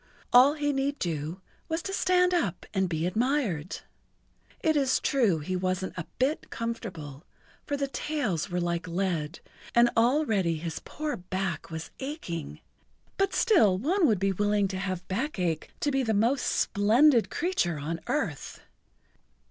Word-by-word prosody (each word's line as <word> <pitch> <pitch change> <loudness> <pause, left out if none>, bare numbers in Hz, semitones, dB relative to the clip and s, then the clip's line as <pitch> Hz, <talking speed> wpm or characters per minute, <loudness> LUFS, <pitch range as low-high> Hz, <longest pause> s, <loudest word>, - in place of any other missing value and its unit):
All 260 +4 +7
he 290 -1 0
need 275 +1 -1
do 165 +1 -3 0.3
was 325 +1 -1
to 390 - -4
stand 360 -1 +3
up 320 - -1
and 190 -2 +1
be 160 -1 -1
admired. 210 - -1 0.8
It 315 -1 +2
is 275 -3 +2
true 230 - +2
he 160 +5 -3
wasn't 185 0 -1
a 165 - -5
bit 275 +5 0
comfortable, 180 -11 -5 0.4
for 285 - -1
the 280 0 -1
tails 255 - -2
were 180 0 -1
like 175 0 -2
lead, 170 -3 -2 0.3
and 240 0 +6
already 225 - +2
his 165 0 -4
poor 305 0 -4
back 180 -3 -3
was 160 0 -6
aching, 265 - -5 0.6
but 390 -1 +1
still 225 - +4
one 330 - +2
would 215 -5 +3
be 195 +2 +1
willing 205 +1 +1
to 185 - -4
have 185 -2 -4
back 235 +8 -2
ache 170 -4 -1
to 290 - +1
be 270 0 +1
the 225 -4 0
most 240 +6 +2
splendid 230 +5 +4
creature 340 - 0
on 160 +3 -3
earth. 170 - -2
205 Hz, 155 wpm, -28 LUFS, 175-280 Hz, 0.8 s, All